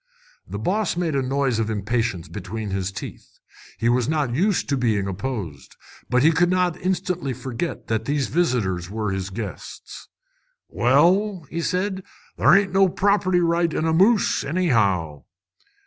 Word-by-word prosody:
The 100 Hz, -, -5 dB
boss 185 Hz, -, -1 dB
made 170 Hz, -3 st, -1 dB
a 135 Hz, -, +2 dB
noise 130 Hz, -2 st, 0 dB
of 110 Hz, -1 st, -1 dB
impatience 105 Hz, -4 st, -2 dB
between 105 Hz, +1 st, -6 dB
his 95 Hz, 0 st, -2 dB
teeth. 95 Hz, -, -9 dB, 0.4 s
He 115 Hz, -, -1 dB
was 120 Hz, +1 st, +2 dB
not 150 Hz, -6 st, 0 dB
used 190 Hz, -, +1 dB
to 140 Hz, -, +2 dB
being 110 Hz, -6 st, 0 dB
opposed, 95 Hz, -, -5 dB, 0.3 s
but 125 Hz, +1 st, +3 dB
he 160 Hz, -, +6 dB
could 175 Hz, +2 st, +2 dB
not 180 Hz, -2 st, +1 dB
instantly 180 Hz, -5 st, -1 dB
forget 130 Hz, +6 st, -5 dB
that 110 Hz, 0 st, -2 dB
these 140 Hz, 0 st, 0 dB
visitors 115 Hz, -, 0 dB
were 105 Hz, -1 st, -2 dB
his 95 Hz, 0 st, -3 dB
guests. 105 Hz, +2 st, -8 dB, 0.6 s
"Well," 175 Hz, -, +2 dB
said 185 Hz, +3 st, -1 dB
he, 190 Hz, -, -10 dB, 0.3 s
"there -, -, +5 dB
ain't 195 Hz, -2 st, +2 dB
no 195 Hz, 0 st, +4 dB
property 185 Hz, -1 st, +2 dB
right 170 Hz, 0 st, +1 dB
in 155 Hz, -, -1 dB
a 160 Hz, -, +1 dB
moose, 200 Hz, +6 st, +3 dB
anyhow!" 100 Hz, -, 0 dB
135 Hz, 155 wpm, -23 LUFS, 110-175 Hz, 0.6 s, he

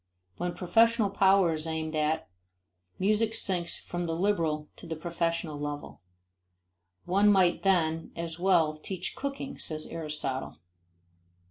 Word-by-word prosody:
When 175 Hz, 0 st, -3 dB
professional 225 Hz, +2 st, +3 dB
power 195 Hz, -3 st, +4 dB
is 155 Hz, +1 st, -4 dB
aimed 160 Hz, 0 st, -3 dB
at, 155 Hz, +1 st, 0 dB, 0.7 s
music 215 Hz, +3 st, +2 dB
sinks 175 Hz, -3 st, +2 dB
from 175 Hz, 0 st, -4 dB
the 165 Hz, -1 st, -2 dB
liberal 165 Hz, -5 st, 0 dB
to -, -, -10 dB
the 165 Hz, -, -3 dB
professional 165 Hz, -1 st, -2 dB
level. 145 Hz, -6 st, -6 dB, 1.0 s
One 200 Hz, +3 st, +4 dB
might 185 Hz, -3 st, +3 dB
then 165 Hz, -4 st, +1 dB
as 165 Hz, 0 st, -5 dB
well 170 Hz, -4 st, +3 dB
teach 185 Hz, +3 st, -5 dB
cooking, 275 Hz, 0 st, -5 dB
says 155 Hz, -1 st, -2 dB
Aristotle. 150 Hz, -5 st, -4 dB
170 Hz, 125 wpm, -29 LUFS, 160-195 Hz, 1.0 s, power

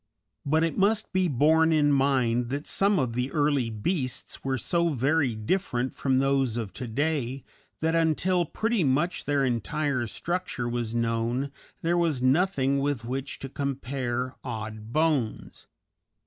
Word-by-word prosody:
But 160 Hz, +3 st, +3 dB
it 165 Hz, +2 st, -1 dB
must 210 Hz, +2 st, +2 dB
be 185 Hz, -1 st, +2 dB
borne 160 Hz, +3 st, +4 dB
in 150 Hz, -2 st, +4 dB
mind 130 Hz, -4 st, +2 dB
that 140 Hz, +3 st, -3 dB
some 200 Hz, 0 st, +2 dB
of 125 Hz, -6 st, 0 dB
the 125 Hz, +3 st, -2 dB
early 145 Hz, -6 st, +1 dB
beasts 130 Hz, -, -3 dB
were 135 Hz, -1 st, 0 dB
so 170 Hz, +7 st, +1 dB
very 140 Hz, -2 st, +1 dB
different 125 Hz, -, -1 dB
from 130 Hz, -2 st, +1 dB
those 135 Hz, -3 st, +1 dB
of 110 Hz, -6 st, -4 dB
to 125 Hz, +5 st, -6 dB
day 135 Hz, +1 st, -1 dB, 0.4 s
that 160 Hz, +1 st, +1 dB
until 165 Hz, +2 st, +2 dB
pretty 220 Hz, +4 st, 0 dB
much 150 Hz, +6 st, 0 dB
their 145 Hz, -2 st, +2 dB
entire 130 Hz, +2 st, -1 dB
structure 175 Hz, -, -3 dB
was 120 Hz, -1 st, -2 dB
known 115 Hz, +4 st, 0 dB, 0.3 s
there 170 Hz, +1 st, +2 dB
was 160 Hz, -6 st, +1 dB
nothing 140 Hz, 0 st, +2 dB
with 140 Hz, -4 st, -1 dB
which 135 Hz, +3 st, -4 dB
to 135 Hz, -, -4 dB
compare 130 Hz, -2 st, -3 dB
odd 110 Hz, -2 st, -6 dB
bones. 150 Hz, -6 st, -1 dB
135 Hz, 150 wpm, -27 LUFS, 120-160 Hz, 0.4 s, borne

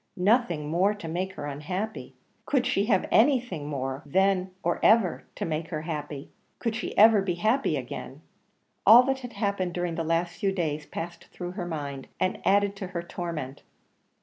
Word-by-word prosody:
Nothing 180 Hz, -, +2 dB
more 185 Hz, +7 st, +2 dB
to 205 Hz, -5 st, -8 dB
make 185 Hz, +4 st, -3 dB
her 145 Hz, -, -6 dB
unhappy! 180 Hz, +10 st, -5 dB, 0.3 s
Could 265 Hz, -3 st, +2 dB
she 210 Hz, -5 st, +1 dB
have 205 Hz, -5 st, +2 dB
anything 240 Hz, -, +3 dB
more, 135 Hz, -1 st, -3 dB
then 190 Hz, +4 st, +2 dB
or -, -, 0 dB
ever, 215 Hz, -5 st, +4 dB
to -, -, -3 dB
make 160 Hz, 0 st, -2 dB
her 155 Hz, -3 st, -4 dB
happy? 150 Hz, -3 st, -5 dB, 0.3 s
Could 230 Hz, -2 st, -2 dB
she 225 Hz, -, -5 dB
ever 215 Hz, 0 st, +7 dB
be 185 Hz, -3 st, -1 dB
happy 220 Hz, +10 st, +1 dB
again? -, -, -7 dB, 0.6 s
All 240 Hz, +3 st, +9 dB
that 265 Hz, +1 st, 0 dB
had 245 Hz, -2 st, -8 dB
happened 200 Hz, -4 st, -1 dB
during 175 Hz, -1 st, -1 dB
the 165 Hz, -, -2 dB
last 165 Hz, +2 st, 0 dB
few 195 Hz, -, +1 dB
days 155 Hz, -5 st, -2 dB
passed 170 Hz, +1 st, -6 dB
through 175 Hz, -1 st, -6 dB
her 180 Hz, -2 st, -5 dB
mind, 140 Hz, -5 st, -5 dB
and 185 Hz, -, 0 dB
added 200 Hz, 0 st, +3 dB
to 195 Hz, -, -5 dB
her 175 Hz, -2 st, -4 dB
torment. 165 Hz, -6 st, -5 dB
180 Hz, 175 wpm, -27 LUFS, 160-205 Hz, 0.6 s, All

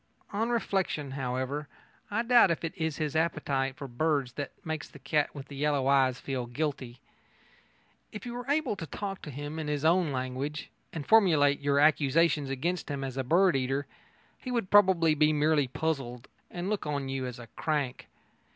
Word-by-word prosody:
On 225 Hz, +3 st, 0 dB
reflection, 190 Hz, -, -1 dB
however, 135 Hz, +2 st, -3 dB, 0.4 s
I 220 Hz, +3 st, 0 dB
doubt 240 Hz, -4 st, +6 dB
if 170 Hz, -, -1 dB
it 165 Hz, -, -3 dB
is 160 Hz, -4 st, -2 dB
his 155 Hz, -1 st, -2 dB
appetite 135 Hz, -5 st, 0 dB
for 140 Hz, -2 st, -6 dB
birds 140 Hz, 0 st, 0 dB
that 140 Hz, +3 st, -5 dB, 0.2 s
makes 160 Hz, -1 st, -3 dB
the -, -, -13 dB
cat 150 Hz, -1 st, 0 dB
with 140 Hz, -1 st, -8 dB
the 140 Hz, -, -9 dB
yellow 145 Hz, -1 st, +1 dB
eyes 135 Hz, -2 st, +3 dB
feel 130 Hz, -3 st, -3 dB
guilty. 130 Hz, -2 st, -3 dB, 1.1 s
If 210 Hz, -, -8 dB
you 240 Hz, -, -5 dB
were 245 Hz, +2 st, -6 dB
able 300 Hz, -6 st, +1 dB
to 165 Hz, -, -6 dB
talk 195 Hz, +5 st, -5 dB
to -, -, -8 dB
him 145 Hz, +3 st, -6 dB
in 155 Hz, -, -4 dB
his 150 Hz, 0 st, -1 dB
own 170 Hz, -1 st, +3 dB
language, 130 Hz, +3 st, -4 dB, 0.2 s
and 155 Hz, -4 st, -5 dB
formulate 155 Hz, -10 st, +5 dB
your 140 Hz, 0 st, +2 dB
accusations 150 Hz, 0 st, +3 dB
against 165 Hz, +6 st, -2 dB
him 140 Hz, -1 st, -3 dB
as 130 Hz, -2 st, -4 dB
a 135 Hz, -, -1 dB
bird 175 Hz, +6 st, +4 dB
eater, 135 Hz, +2 st, 0 dB, 0.5 s
he 255 Hz, -, -7 dB
would 235 Hz, -6 st, -1 dB
probably 185 Hz, -6 st, +5 dB
be 155 Hz, 0 st, +3 dB
merely 150 Hz, -1 st, +2 dB
puzzled 130 Hz, -4 st, -3 dB, 0.2 s
and 175 Hz, +1 st, -5 dB
look 205 Hz, -6 st, -2 dB
on 140 Hz, -2 st, -2 dB
you 135 Hz, -1 st, -3 dB
as 125 Hz, 0 st, -7 dB
a 120 Hz, -, -9 dB
crank. 145 Hz, -5 st, -2 dB
150 Hz, 185 wpm, -29 LUFS, 135-170 Hz, 1.1 s, doubt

